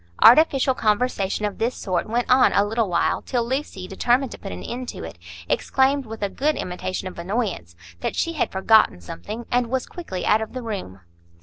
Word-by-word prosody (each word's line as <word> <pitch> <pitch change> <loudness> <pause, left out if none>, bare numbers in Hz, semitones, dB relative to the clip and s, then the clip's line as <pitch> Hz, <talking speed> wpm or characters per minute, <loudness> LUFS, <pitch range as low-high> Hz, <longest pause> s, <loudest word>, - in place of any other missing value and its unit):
Artificial 270 +1 +6
conversation 210 -3 0
of 205 - -4
this 235 +3 0
sort 185 +1 -2
went 240 +2 0
on 255 0 +5
a 200 - +4
little 220 0 0
while, 170 -1 +1
till 240 -3 -1
Lucy, 260 -7 -3
determined 245 +7 +1
to - - -9
put - - -7
an 90 0 -7
end 250 +1 -5
to - - -7
it, 80 +1 -9 0.3
exclaimed, 270 - +1
with 220 -1 -7
a - - +2
good 295 +8 0
imitation 185 -1 -4
of 185 - -8
annoyance, 185 - -3 0.2
that - - -3
she 335 - 0
had 310 - -1
forgotten 190 - +4
something, 90 - -7
and 245 -1 +2
was 260 +2 -1
quickly 260 - -6
out 215 - +4
of 220 - -5
the 255 -1 -5
room. 190 - -6
225 Hz, 200 wpm, -23 LUFS, 190-255 Hz, 0.3 s, Artificial